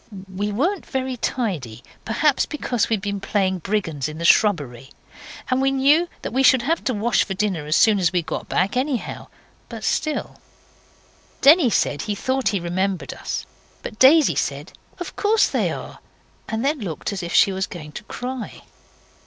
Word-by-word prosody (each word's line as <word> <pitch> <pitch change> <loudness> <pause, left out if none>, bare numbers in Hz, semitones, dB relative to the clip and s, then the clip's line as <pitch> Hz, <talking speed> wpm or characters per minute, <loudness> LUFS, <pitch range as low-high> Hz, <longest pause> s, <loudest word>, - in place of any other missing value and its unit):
We 205 +2 -2
weren't 335 - 0
very 260 -1 -2
tidy, 165 - -3 0.2
perhaps, 275 +5 +1
because 250 -6 -1
we'd 220 -4 0
been 200 -1 -2
playing 190 -3 0
brigands 165 -7 -2
in 155 - -8
the 170 - -4
shrubbery; 145 - +2 0.6
and 255 +1 +2
we 270 - +3
knew 285 +6 +3 0.2
we 260 +3 0
should 260 -2 +5
have 325 +6 0
to 255 - +1
wash 220 +3 +2
for 195 - -5
dinner 185 -7 -2
as 155 - +1
soon 215 -1 +4
as 175 -3 +2
we 180 -2 0
got 160 - -5
back, 190 +5 0
anyhow. 255 -1 -2 0.4
But - - -8
still 310 -1 -2 1.0
Denny 295 -1 +7
said 145 -8 0
he 210 - -3
thought 260 +5 -1
he 200 - +1
remembered 175 -3 -2
us. - - -5 0.4
But 215 - -8
Daisy 295 +4 +6
said, - - -3 0.3
'Of 355 - -7
course 425 +1 +3
they - - 0
are,' - - -8 0.5
and 225 +3 -2
then 295 +1 +1
looked 190 -2 -4
as 195 - -4
if 175 0 -4
she 195 - +6
was 190 0 -2
going 155 -4 -9
to - - -8
cry. 250 -1 -6
210 Hz, 175 wpm, -22 LUFS, 180-265 Hz, 1.0 s, Denny